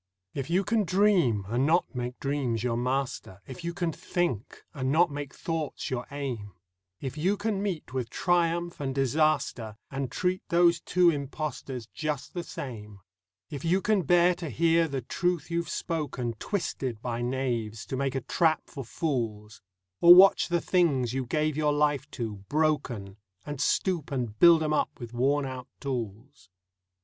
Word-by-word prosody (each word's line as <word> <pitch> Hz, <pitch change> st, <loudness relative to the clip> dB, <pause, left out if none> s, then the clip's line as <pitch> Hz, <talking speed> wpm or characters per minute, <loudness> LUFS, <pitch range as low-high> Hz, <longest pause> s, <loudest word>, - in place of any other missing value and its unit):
If 135 Hz, +1 st, -4 dB
you 185 Hz, +3 st, +2 dB
can 220 Hz, +1 st, +1 dB
dream 180 Hz, -, +3 dB
and 120 Hz, +6 st, +1 dB
not 170 Hz, +3 st, +2 dB
make 125 Hz, 0 st, -4 dB
dreams 135 Hz, -5 st, -1 dB
your 120 Hz, -2 st, 0 dB
master; 125 Hz, -5 st, -2 dB
If 130 Hz, +4 st, -9 dB
you 170 Hz, -, -2 dB
can 170 Hz, -1 st, -2 dB
think 160 Hz, -, -3 dB
and 130 Hz, -2 st, -1 dB
not 165 Hz, +2 st, +4 dB
make 145 Hz, -1 st, -5 dB
thoughts 160 Hz, -5 st, -4 dB
your 125 Hz, -1 st, -3 dB
aim; 125 Hz, -8 st, -5 dB, 0.5 s
If 135 Hz, +3 st, -5 dB
you 190 Hz, +6 st, +1 dB
can 200 Hz, -1 st, -1 dB
meet 185 Hz, -10 st, -3 dB
with 125 Hz, -3 st, -2 dB
Triumph 175 Hz, +2 st, 0 dB
and 135 Hz, -2 st, -3 dB
Disaster 135 Hz, -5 st, +1 dB
And 135 Hz, -2 st, -3 dB
treat 185 Hz, +5 st, 0 dB
those 170 Hz, 0 st, +4 dB
two 180 Hz, -1 st, +4 dB
impostors 140 Hz, -4 st, -4 dB
just 145 Hz, +7 st, -4 dB
the 175 Hz, -, -3 dB
same; 105 Hz, -, -8 dB, 0.5 s
If 140 Hz, -, -6 dB
you 175 Hz, +3 st, +3 dB
can 210 Hz, 0 st, +2 dB
bear 175 Hz, +3 st, +4 dB
to 170 Hz, -3 st, -6 dB
hear 165 Hz, +4 st, +3 dB
the 135 Hz, -3 st, -3 dB
truth 175 Hz, +5 st, -1 dB
you've 170 Hz, -1 st, -1 dB
spoken 145 Hz, -8 st, -3 dB
Twisted 130 Hz, -, -3 dB
by 120 Hz, -1 st, -2 dB
knaves 120 Hz, -4 st, -2 dB
to -, -, -4 dB
make 135 Hz, 0 st, -1 dB
a 135 Hz, -, -1 dB
trap 160 Hz, +5 st, +1 dB
for 140 Hz, -4 st, -8 dB
fools, 115 Hz, -6 st, -3 dB, 0.4 s
Or 175 Hz, +1 st, +10 dB
watch 195 Hz, +2 st, +7 dB
the 175 Hz, -1 st, 0 dB
things 140 Hz, -10 st, +2 dB
you 130 Hz, -2 st, -2 dB
gave 155 Hz, +2 st, 0 dB
your 150 Hz, -1 st, +2 dB
life 145 Hz, -2 st, +1 dB
to 110 Hz, -5 st, -3 dB
broken, 130 Hz, -10 st, 0 dB, 0.3 s
And 145 Hz, -2 st, -5 dB
stoop 175 Hz, -4 st, 0 dB
and 120 Hz, -6 st, -3 dB
build 170 Hz, -2 st, +7 dB
'em 155 Hz, 0 st, 0 dB
up 150 Hz, -, -1 dB
with 120 Hz, -2 st, -8 dB
worn 135 Hz, +4 st, +1 dB
out 130 Hz, -1 st, -6 dB
tools. 120 Hz, -4 st, -5 dB
140 Hz, 165 wpm, -28 LUFS, 125-170 Hz, 0.5 s, Or